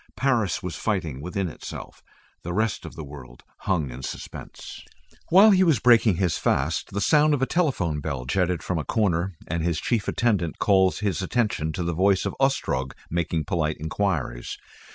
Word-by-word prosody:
Paris 120 Hz, -8 st, +1 dB
was 90 Hz, -2 st, -4 dB
fighting 85 Hz, -, -2 dB
within 90 Hz, +3 st, -2 dB
itself. 80 Hz, -, -9 dB, 0.4 s
The 85 Hz, +1 st, -5 dB
rest 110 Hz, -4 st, -1 dB
of -, -, -11 dB
the 80 Hz, -, -6 dB
world 70 Hz, -4 st, -12 dB, 0.3 s
hung 80 Hz, -9 st, +1 dB
in -, -, -8 dB
suspense. -, -, -8 dB, 0.5 s
While 200 Hz, +5 st, +8 dB
he 190 Hz, -1 st, +5 dB
was 160 Hz, -7 st, +4 dB
breaking 115 Hz, -3 st, +5 dB
his 85 Hz, -2 st, 0 dB
fast, -, -, 0 dB
the 100 Hz, -, -2 dB
sound 150 Hz, +2 st, +4 dB
of 135 Hz, -, -4 dB
a -, -, +4 dB
telephone 130 Hz, -, 0 dB
bell 70 Hz, -4 st, -4 dB
jetted 90 Hz, +5 st, 0 dB
from 90 Hz, -3 st, -1 dB
a -, -, -2 dB
corner, 95 Hz, -2 st, 0 dB
and 85 Hz, 0 st, -2 dB
his 85 Hz, -2 st, 0 dB
chief 115 Hz, -4 st, -1 dB
attendant 100 Hz, -9 st, 0 dB
called 95 Hz, -2 st, +3 dB
his 100 Hz, -4 st, -1 dB
attention 95 Hz, -7 st, 0 dB
to 90 Hz, -, -3 dB
the 85 Hz, 0 st, -1 dB
voice 95 Hz, +3 st, +2 dB
of -, -, -3 dB
Ostrog 65 Hz, -, 0 dB, 0.2 s
making 85 Hz, -2 st, -1 dB
polite 75 Hz, -1 st, -1 dB
enquiries. 80 Hz, -7 st, -2 dB
90 Hz, 175 wpm, -25 LUFS, 80-110 Hz, 0.5 s, While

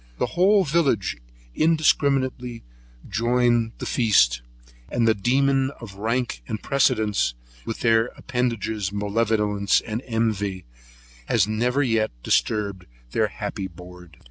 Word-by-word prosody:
The -, -, -2 dB
whole 195 Hz, +4 st, +4 dB
village 140 Hz, -, +1 dB, 0.4 s
indiscriminately 135 Hz, -6 st, +1 dB, 0.4 s
join 120 Hz, +2 st, +1 dB
the -, -, -6 dB
feast; -, -, +3 dB, 0.5 s
and 120 Hz, -1 st, +1 dB
the 110 Hz, -, +5 dB
demon 135 Hz, +5 st, +2 dB
of 110 Hz, -5 st, -9 dB
rank 110 Hz, -, -2 dB
and 110 Hz, -, -3 dB
precedence, 110 Hz, -, +1 dB, 0.3 s
with 115 Hz, -, -5 dB
their 115 Hz, 0 st, +3 dB
appendages 110 Hz, -5 st, -2 dB
malevolence 105 Hz, -1 st, +1 dB
and 110 Hz, +2 st, -5 dB
envy, 105 Hz, -5 st, -1 dB, 0.6 s
has 105 Hz, -3 st, +2 dB
never 125 Hz, +6 st, +1 dB
yet 115 Hz, -4 st, +1 dB
disturbed 100 Hz, -4 st, 0 dB, 0.2 s
their -, -, +1 dB
happy 95 Hz, -, -5 dB
board. 90 Hz, -3 st, -14 dB
115 Hz, 115 wpm, -24 LUFS, 100-125 Hz, 0.6 s, the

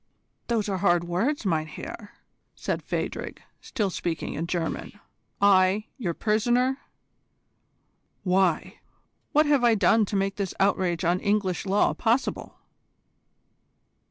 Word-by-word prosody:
"Those 225 Hz, -3 st, 0 dB
are 195 Hz, -2 st, -2 dB
hard 175 Hz, 0 st, +3 dB
words, 210 Hz, -, -1 dB
mein 160 Hz, -4 st, 0 dB
Herr," 205 Hz, +6 st, -9 dB, 0.4 s
said -, -, -3 dB
Phadrig, -, -, -4 dB, 0.2 s
still 210 Hz, -7 st, -2 dB
speaking 170 Hz, -2 st, -3 dB
in 165 Hz, +3 st, -3 dB
German. 175 Hz, +3 st, -3 dB, 0.4 s
"I 200 Hz, +1 st, +4 dB
your 175 Hz, -8 st, -2 dB
prisoner! 240 Hz, +5 st, +1 dB, 1.4 s
Why? 185 Hz, -2 st, +1 dB, 0.5 s
What 305 Hz, +1 st, +4 dB
have 290 Hz, -4 st, +3 dB
I 235 Hz, -2 st, +5 dB
done 215 Hz, +2 st, +4 dB
to 200 Hz, -, -4 dB
make 195 Hz, 0 st, 0 dB
this 195 Hz, -3 st, -3 dB
outrage 185 Hz, -3 st, +1 dB
on 175 Hz, +2 st, +2 dB
English 200 Hz, -3 st, 0 dB
law 200 Hz, +2 st, +3 dB
possible?" 240 Hz, +3 st, -1 dB
195 Hz, 120 wpm, -26 LUFS, 180-225 Hz, 1.4 s, I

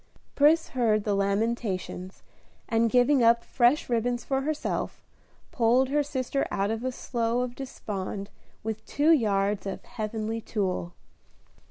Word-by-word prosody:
Pris 310 Hz, +3 st, +4 dB
heard 220 Hz, -5 st, +1 dB
the 205 Hz, -, 0 dB
lamentations, 200 Hz, -2 st, -2 dB, 0.4 s
and 230 Hz, 0 st, +2 dB
giving 250 Hz, +3 st, +4 dB
up 235 Hz, 0 st, +5 dB
fresh 250 Hz, +4 st, +2 dB
ribbons 240 Hz, 0 st, 0 dB
for 270 Hz, -1 st, 0 dB
herself, 305 Hz, +2 st, -3 dB, 0.5 s
pulled 250 Hz, +2 st, +3 dB
her 295 Hz, +2 st, +2 dB
sister 275 Hz, -1 st, -2 dB
out 200 Hz, +2 st, 0 dB
of 225 Hz, +1 st, -3 dB
a 255 Hz, -, -1 dB
slough 240 Hz, -1 st, -1 dB
of 250 Hz, -1 st, -4 dB
despond 200 Hz, -6 st, -5 dB, 0.3 s
with 220 Hz, 0 st, -4 dB
two 300 Hz, +3 st, +3 dB
yards 200 Hz, -7 st, +2 dB
of 195 Hz, -, -5 dB
"heavenly 220 Hz, -1 st, -4 dB
tulle." 185 Hz, -5 st, -2 dB
230 Hz, 135 wpm, -27 LUFS, 210-255 Hz, 0.5 s, up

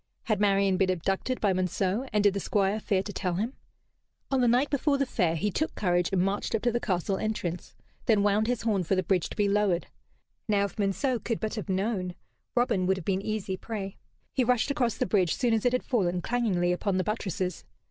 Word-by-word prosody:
Had 215 Hz, -4 st, 0 dB
Marian 195 Hz, -2 st, +3 dB
been 190 Hz, 0 st, +2 dB
abducted 195 Hz, +8 st, -1 dB
by 200 Hz, -3 st, +2 dB
Monceux, 185 Hz, +6 st, -1 dB
and 210 Hz, -1 st, +2 dB
did 205 Hz, -2 st, +5 dB
the 200 Hz, -, -2 dB
Squire 200 Hz, +2 st, +1 dB
fear 195 Hz, -3 st, 0 dB
to 205 Hz, -, -6 dB
tell 180 Hz, -2 st, -1 dB
him? 220 Hz, +8 st, -2 dB, 0.8 s
On 265 Hz, -1 st, +2 dB
the 245 Hz, -, +4 dB
night 250 Hz, +5 st, +3 dB
before 285 Hz, 0 st, +2 dB
the 275 Hz, -, +1 dB
Fair 180 Hz, -9 st, 0 dB
he 205 Hz, +6 st, 0 dB
took 315 Hz, -, -1 dB
courage 175 Hz, -3 st, +1 dB
and 185 Hz, -2 st, +2 dB
marched 200 Hz, +3 st, -1 dB
up 220 Hz, -, -2 dB
to 240 Hz, -, +3 dB
the 240 Hz, -, 0 dB
castle 190 Hz, -2 st, -1 dB
entrance, 185 Hz, -5 st, -3 dB, 0.3 s
then 215 Hz, -3 st, +4 dB
wound 210 Hz, +2 st, +2 dB
his 245 Hz, -2 st, -1 dB
horn 210 Hz, -4 st, +1 dB
for 185 Hz, +3 st, +1 dB
the 185 Hz, -, +1 dB
bridge 180 Hz, -1 st, +1 dB
to -, -, -8 dB
be 205 Hz, -1 st, +2 dB
lowered. 200 Hz, -3 st, +2 dB, 0.6 s
Now, 205 Hz, -2 st, +2 dB
if 200 Hz, -, -8 dB
Monceux 225 Hz, +6 st, +1 dB
could 230 Hz, -2 st, -1 dB
but 220 Hz, -, -2 dB
have 215 Hz, -3 st, -5 dB
known, 190 Hz, -2 st, -1 dB, 0.4 s
Robin 230 Hz, -7 st, +2 dB
would 190 Hz, 0 st, +2 dB
have 180 Hz, -, -7 dB
been 195 Hz, -1 st, 0 dB
easy 200 Hz, -2 st, -3 dB
prey. 195 Hz, -2 st, -5 dB, 0.4 s
He 260 Hz, -, +2 dB
rushed 250 Hz, +2 st, +2 dB
across 250 Hz, -6 st, 0 dB
the -, -, +1 dB
bridge 185 Hz, -3 st, +2 dB
soon 240 Hz, -3 st, +1 dB
as 220 Hz, 0 st, 0 dB
it -, -, +2 dB
had 250 Hz, -, +1 dB
fallen, 180 Hz, -7 st, 0 dB
clangingly, 200 Hz, -8 st, +1 dB
upon 185 Hz, +2 st, 0 dB
the 185 Hz, -, +1 dB
buttresses. 190 Hz, -4 st, -3 dB
200 Hz, 225 wpm, -28 LUFS, 185-230 Hz, 0.8 s, did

